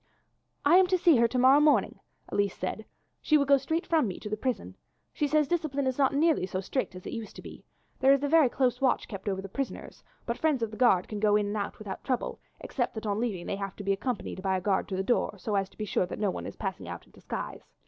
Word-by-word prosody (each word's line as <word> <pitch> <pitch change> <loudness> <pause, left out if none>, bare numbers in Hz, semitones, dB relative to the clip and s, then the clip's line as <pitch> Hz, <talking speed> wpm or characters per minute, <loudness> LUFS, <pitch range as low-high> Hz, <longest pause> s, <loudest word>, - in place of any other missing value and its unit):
"I 320 +5 +7
am 375 -1 +5
to 370 0 +2
see 335 -5 +5
her 235 0 +4
to 255 - -3
morrow 260 +3 +6
morning," 300 0 +3 0.3
Elise 200 -2 0
said. 200 +4 -4 0.4
"She 305 - +4
will 280 - +2
go 280 0 +6
straight 320 +6 -2
from 315 -7 +2
me 185 - -5
to 210 - -7
the - - +1
prison. 215 - -3 0.4
She 295 - 0
says 300 0 +2
discipline 300 -5 -1
is 260 +1 -1
not 270 -2 +4
nearly 295 - +2
so 185 - -3
strict 195 +2 -3
as 185 - -10
it - - -5
used 225 -2 -6
to - - -10
be. - - -11 0.4
There 265 +1 +5
is 275 0 +3
a - - +2
very 310 -3 +5
close 255 0 0
watch 260 -2 +2
kept 195 -1 -5
over 190 -1 -3
the - - -6
prisoners, 270 +7 -6 0.2
but 235 - -3
friends 300 -7 +1
of 220 - -2
the - - -7
guards 195 -8 +4
can 210 - -6
go 210 0 +3
in 210 -1 +2
and 205 +1 -3
out 200 -1 -3
without 205 -3 -7
trouble, 255 -3 -2 0.2
except 245 -3 -2
that 220 - -5
on 205 0 -1
leaving 210 -7 -2
they 195 - -3
have 195 -1 -5
to 205 - -8
be 200 0 +2
accompanied 205 -2 -4
by 190 -1 +1
the - - -14
guard 200 0 0
at - - -1
the 190 - 0
door, 210 -1 0
so 210 +3 -4
as 195 -1 0
to - - -24
be 215 - -3
sure 185 -2 0
that - - -6
no 205 -2 0
one - - -6
is - - -8
passing - - -5
out - - -7
in - - -24
disguise. - - -6
230 Hz, 275 wpm, -28 LUFS, 200-275 Hz, 0.4 s, I